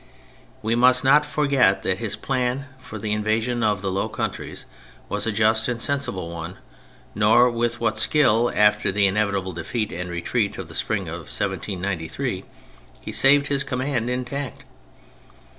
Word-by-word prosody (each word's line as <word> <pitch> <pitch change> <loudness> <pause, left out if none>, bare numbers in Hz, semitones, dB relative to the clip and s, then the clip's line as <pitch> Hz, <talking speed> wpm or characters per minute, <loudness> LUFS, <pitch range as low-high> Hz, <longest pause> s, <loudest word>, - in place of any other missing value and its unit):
We 110 +1 +1
must 125 +2 +4
not 145 +3 +5
forget 135 -10 +2
that 95 +1 0
his 110 -3 -1
plan 130 0 -1
for 110 - -9
the 105 0 -4
invasion 110 +3 0
of 105 -2 +1
the 95 - -1
Low 95 - -1
Countries - - -5 0.4
was - - -1
a - - +1
just 110 +1 +2
and 120 -2 -2
sensible 120 -11 -2
one, 85 +2 -7 0.6
nor 110 +4 +4
with 120 0 -1
what 110 -1 0
skill, 120 -1 +3
after 105 -1 +3
the 100 +1 +2
inevitable 100 -2 0
defeat 105 +6 -3
and 90 +1 -5
retreat 100 +5 -1
of 95 -3 -7
the - - -10
spring 100 +1 -2
of 85 -2 -7
1793, 95 -4 -3 0.6
he - - -7
saved 140 +1 +5
his 140 -1 0
command 130 -2 -2
intact. 125 +1 -4
110 Hz, 155 wpm, -23 LUFS, 95-125 Hz, 0.6 s, not